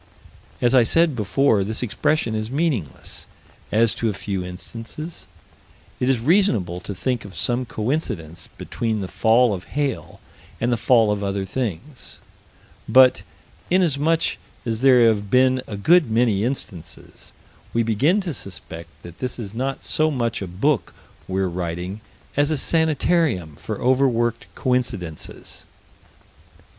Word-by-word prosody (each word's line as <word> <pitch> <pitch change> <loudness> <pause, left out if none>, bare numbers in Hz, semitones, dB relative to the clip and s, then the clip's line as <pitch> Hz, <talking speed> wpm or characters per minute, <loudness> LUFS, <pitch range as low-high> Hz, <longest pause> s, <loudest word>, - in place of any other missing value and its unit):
As 120 - +4
I 130 - +7
said 160 +5 +3
before, 110 0 +2
this 110 +5 -3
expression 125 +1 0
is 110 0 -3
meaningless 135 - -3 0.4
as 115 +1 +3
to 115 - -1
a - - -2
few 95 -1 -4
instances; 115 - -8 0.7
it 125 - +1
is 135 - +3
reasonable 115 - +2
to 95 +2 -7
think 125 +5 -2
of 100 -3 -11
some 125 +6 0
coincidence 105 - -3
between 110 -3 -2
the 95 - -4
fall 115 +3 +3
of 90 -1 -6
hail 145 -4 -2 0.4
and 120 +1 +1
the - - +1
fall 115 -1 +4
of 105 -1 -1
other 100 0 -2
things: 125 - -5 0.7
but, 130 +2 +6 0.5
inasmuch 165 -2 +2 0.3
as 115 -1 -2
there 125 -3 +6
have 105 -2 +1
been 130 +2 +4
a 105 - -5
good 160 - +4
many 110 -3 +2
instances, 90 - -6 0.4
we 115 - +1
begin 135 - +2
to 175 -5 -4
suspect 85 - -8
that 85 0 -11
this 125 -1 -4
is 105 -4 -7
not 135 +3 -3
so 155 0 +1
much 120 -7 -1
a 95 - -4
book 110 - 0 0.3
we're 95 0 0
writing 90 +3 -4 0.3
as 145 +1 +2
a 155 - 0
sanitarium 155 - +1
for - - -6
overworked 120 -3 +1
coincidences. 120 - -3
115 Hz, 140 wpm, -22 LUFS, 100-135 Hz, 0.7 s, I